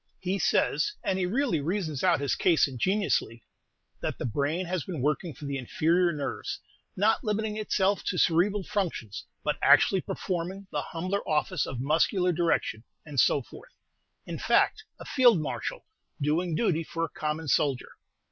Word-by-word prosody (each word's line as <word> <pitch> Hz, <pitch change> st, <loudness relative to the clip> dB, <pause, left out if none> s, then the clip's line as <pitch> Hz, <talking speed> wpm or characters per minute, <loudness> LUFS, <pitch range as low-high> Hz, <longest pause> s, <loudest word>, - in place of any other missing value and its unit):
He 190 Hz, +2 st, -2 dB
says 420 Hz, -, +1 dB
and 190 Hz, -, 0 dB
he 180 Hz, -, 0 dB
really 230 Hz, -, 0 dB
reasons 160 Hz, -3 st, -2 dB
out 175 Hz, -5 st, +4 dB
his 140 Hz, -, 0 dB
case 170 Hz, -5 st, +3 dB
ingeniously 135 Hz, -, 0 dB, 0.6 s
that -, -, -3 dB
the -, -, -4 dB
brain 145 Hz, -, -1 dB
has 175 Hz, -3 st, -2 dB
been 175 Hz, -6 st, -5 dB
working 150 Hz, +5 st, 0 dB
for 145 Hz, +1 st, -10 dB
the 140 Hz, -1 st, -3 dB
inferior 170 Hz, +7 st, +2 dB
nerves, 145 Hz, -3 st, -4 dB, 0.4 s
not 215 Hz, +4 st, +2 dB
limiting 215 Hz, -1 st, -1 dB
itself 205 Hz, -2 st, +1 dB
to 180 Hz, -, -1 dB
cerebral 190 Hz, +5 st, +2 dB
functions, 175 Hz, -, -3 dB, 0.2 s
but -, -, -1 dB
actually 190 Hz, -, +5 dB
performing 185 Hz, +3 st, -4 dB
the -, -, -1 dB
humbler 185 Hz, +4 st, -3 dB
office 155 Hz, +2 st, 0 dB
of 130 Hz, -, -5 dB
muscular 170 Hz, +6 st, +2 dB
direction, 165 Hz, -9 st, 0 dB, 0.2 s
and 145 Hz, -4 st, -3 dB
so 140 Hz, -, +4 dB
forth; -, -, -14 dB, 0.5 s
in -, -, -6 dB
fact, -, -, +2 dB, 0.2 s
a -, -, -9 dB
field 245 Hz, -, +5 dB
marshal -, -, -4 dB, 0.3 s
doing 160 Hz, +4 st, 0 dB
duty 165 Hz, -5 st, +1 dB
for 165 Hz, +1 st, -4 dB
a -, -, -9 dB
common 155 Hz, +1 st, -3 dB
soldier! 140 Hz, -2 st, +1 dB
170 Hz, 160 wpm, -28 LUFS, 150-195 Hz, 0.6 s, actually